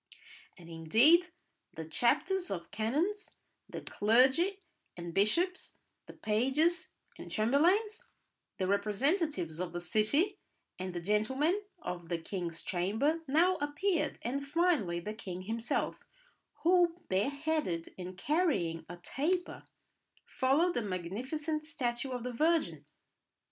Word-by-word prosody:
And 170 -3 -13
indeed 225 - +4 0.5
the 160 - -5
chapters 315 - +1
of 170 -2 -5
canons, 315 - -1 0.3
the - - -6
clergy 265 - +3 0.4
and 170 -1 -6
bishops, 340 - +1 0.3
the - - -10
pages 300 - +1 0.3
and - - -8
chamberlains, 345 - +2 0.5
the 190 - 0
representatives 205 - 0
of 180 -1 -3
the 175 - -2
city, 280 - +1 0.4
and 185 -1 -4
the 175 - -3
gentlemen 265 - +1 0.2
of 175 -2 -5
the 170 - 0
king's 170 0 -5
chamber 220 - 0
now 345 +6 +3
appeared, 310 +5 0
and 275 +4 -2
finally 290 - +1
the 210 +5 -5
king 185 -4 -7
himself, 225 +4 -2 0.6
who, 350 0 +4
bare 190 +7 +1
headed 285 - -2
and 185 0 -7
carrying 175 - 0
a 175 - -7
taper, 335 - -2 0.6
followed 295 +7 +2
the 240 - 0
magnificent 250 - -3
statue 265 -4 -2
of 250 -2 -4
the 250 0 -4
Virgin. 235 - +1
250 Hz, 120 wpm, -32 LUFS, -, 0.6 s, indeed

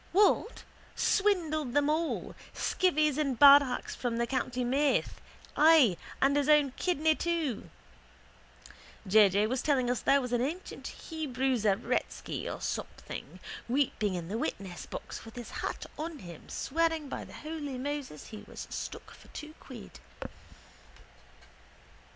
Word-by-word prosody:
What? 415 +4 +3 0.3
Swindled 320 - +1
them 290 0 +3
all, 315 +2 -1 0.2
skivvies 310 -6 +1
and 275 -5 -1
badhachs 280 -2 +6
from 240 -2 -2
the 235 - +1
county 255 0 -2
Meath, 275 +4 +1 0.3
ay, 300 - +6 0.2
and 275 +1 +3
his 290 0 +1
own 295 -3 +5
kidney 315 +1 +1
too. 320 -8 -2 1.4
J. 205 +1 +7
J. 200 +3 +2
was 250 +3 -1
telling 260 -5 +2
us 245 - -1
there 280 - +4
was 250 -2 -4
an 240 - +2
ancient 325 +9 -4
Hebrew 270 -5 -2
Zaretsky 210 -1 -1
or - - -4
something - - -6 0.3
weeping 235 -7 +1
in 170 -2 -4
the 215 +5 -3
witnessbox 190 -6 -5
with 225 +1 -12
his 240 -2 -8
hat - - -4
on 320 0 -4
him, 175 - -11
swearing 325 0 0
by - - -5
the - - -13
holy 300 -4 -5
Moses 275 - -5
he 215 - -9
was - - -8
stuck - - -6
for - - -16
two 305 0 -9
quid. - - -11
275 Hz, 135 wpm, -30 LUFS, 240-310 Hz, 1.4 s, J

